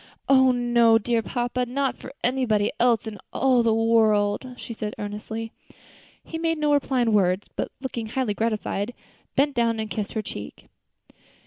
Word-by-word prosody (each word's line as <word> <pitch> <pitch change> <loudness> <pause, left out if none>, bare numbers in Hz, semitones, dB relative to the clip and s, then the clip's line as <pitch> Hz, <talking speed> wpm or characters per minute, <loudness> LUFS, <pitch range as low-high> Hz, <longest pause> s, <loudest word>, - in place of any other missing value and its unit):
"Oh! 260 -1 +6
no, 240 -2 +4
dear 230 +1 0
papa, 245 +2 -2
not 270 +2 -1
for 260 - -10
anybody 235 -5 +1
else 235 -2 +3
in 215 -2 -7
all 260 -2 +3
the 230 -1 +2
world," 225 +1 +2
she 235 - -7
said 215 -1 -5
earnestly. 215 +2 -5 0.7
He 325 - -6
made 330 0 0
no 300 -1 +2
reply 270 -3 +1
in 225 -2 +1
words, 190 -1 +2
but, - - -3
looking 240 -4 -4
highly 240 -1 -1
gratified, 215 +1 -2 0.4
bent 285 +1 +3
down 230 -2 +1
and 220 -1 -4
kissed 210 -2 -3
her 220 - -2
cheek. 105 - -9
230 Hz, 160 wpm, -24 LUFS, 215-255 Hz, 0.7 s, Oh